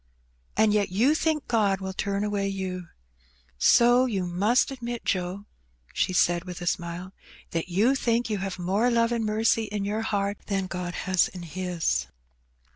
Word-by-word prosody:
And 215 -1 +4
yet 205 -1 +2
you 230 +11 +3
think 315 -1 0
God 205 -5 +2
will 190 0 -5
turn 200 +1 -1
away 205 -1 -1
you. 185 -2 -4 0.7
So 240 - +5
you 195 -6 -1
must 205 +10 +2
admit, 240 -3 -5
Joe, 185 +1 -2 0.5
she - - +1
said 175 -1 +2
with 180 -1 -7
a 175 - -6
smile, 175 +1 -3 0.2
'' - - -22
that 165 +1 -2
you 210 +9 +3
think 240 -3 +1
you 210 -3 -2
have 190 -1 -4
more 195 +7 +1
love 230 -1 +2
and 235 -1 0
mercy 220 +1 +2
in 205 -1 -3
your 210 +2 -1
heart 200 -2 -1
than 195 -2 -1
God 180 -1 -5
has 185 -2 +3
in 180 -1 -9
His 175 +1 -1
200 Hz, 175 wpm, -26 LUFS, 180-225 Hz, 0.7 s, So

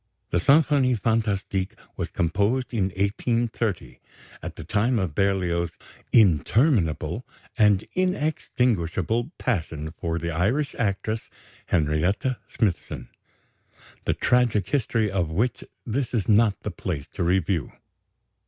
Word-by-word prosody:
The 85 - +2
Symphonie 140 - +4
fantastique 105 -3 -1 0.2
was - - -3
composed 105 +10 0
in 105 -5 +1
1830, 105 +2 -1 0.4
at - - -6
the - - -8
time 115 +4 +1
of 95 -7 -1
Berlioz's 85 -3 0 0.3
"interminable 100 - +3 0.3
and 105 -3 +4
inextinguishable" 125 - 0
passion 80 - -2
for 80 0 -3
the 85 0 -2
Irish 110 - 0
actress 110 0 -1 0.4
Henrietta 85 - +1
Smithson 95 -7 -2 1.0
the - - +1
tragic 120 -6 +2
history 110 -5 +1
of 90 -4 0
which 110 +9 -1 0.2
this 125 +2 -2
is 105 - 0
not 105 -1 +4
the 105 - -4
place 80 -5 -4
to - - -6
review. 85 -4 +1
100 Hz, 110 wpm, -25 LUFS, 85-120 Hz, 1.0 s, Symphonie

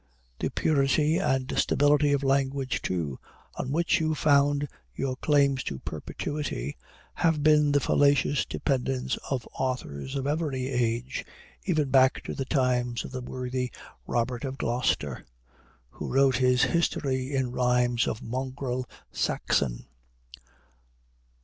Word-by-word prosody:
The - - -1
purity 150 +2 +2
and 130 -8 0
stability 145 0 +3
of 140 -1 +1
language, 135 -1 0
too, 80 -7 -2 0.3
on - - -4
which 170 +3 +2
you 155 -1 0
found 145 -1 +3 0.3
your 130 -1 -2
claims 140 -1 +2
to 70 - -3
perpetuity, 75 - -4 0.4
have 160 -4 +1
been 150 -1 +5
the 145 - +4
fallacious 140 0 +3
dependence 130 -2 -1
of 130 -4 -2
authors 130 - -3
of 135 -1 -2
every 145 -4 -1
age, 125 0 -1 0.4
even 155 -8 +1
back 130 -1 +4
to - - -5
the 135 - -3
times 125 -4 0
of - - -8
the 130 -1 -4
worthy 125 0 -3 0.4
Robert 120 0 -1
of 135 -1 -4
Gloucester, 115 - -1 0.7
who - - -6
wrote 135 -1 +4
his 125 -1 +3
history 135 -5 0
in 130 -2 0
rhymes 125 -1 +2
of 110 - -3
mongrel 130 0 -3 0.2
Saxon. 60 -4 0
130 Hz, 125 wpm, -27 LUFS, 125-145 Hz, 0.7 s, been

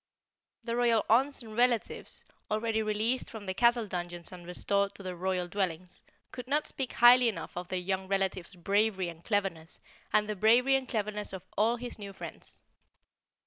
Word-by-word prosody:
The 230 -1 -2
royal 235 -3 +3
aunts 265 +3 +3
and 220 -1 -10
relatives, 240 -1 +1 0.2
already 220 +1 0
released 220 +4 0
from 220 -3 -8
the 190 - -2
castle 235 +2 +3
dungeons 175 -3 -5
and 175 -2 -10
restored 200 +3 0
to 200 - -9
their 185 -1 -5
royal 180 0 -1
dwellings, 180 -2 -3 0.3
could 250 -1 -8
not 295 +3 +1
speak 265 -2 -3
highly 245 0 +7
enough 215 - -6
of 175 0 -5
their 185 - -2
young 190 +1 -2
relative's 190 -1 -1
bravery 195 +1 +1
and 165 0 -11
cleverness 195 -6 -2 0.3
and 210 0 +3
the 210 - -2
bravery 235 +6 +4
and 265 -1 -2
cleverness 210 -3 -3
of 190 - -7
all 220 +4 +3
of 240 - -11
his 245 -3 -6
new 200 -1 -7
friends. - - -4
210 Hz, 180 wpm, -30 LUFS, 185-235 Hz, 0.3 s, highly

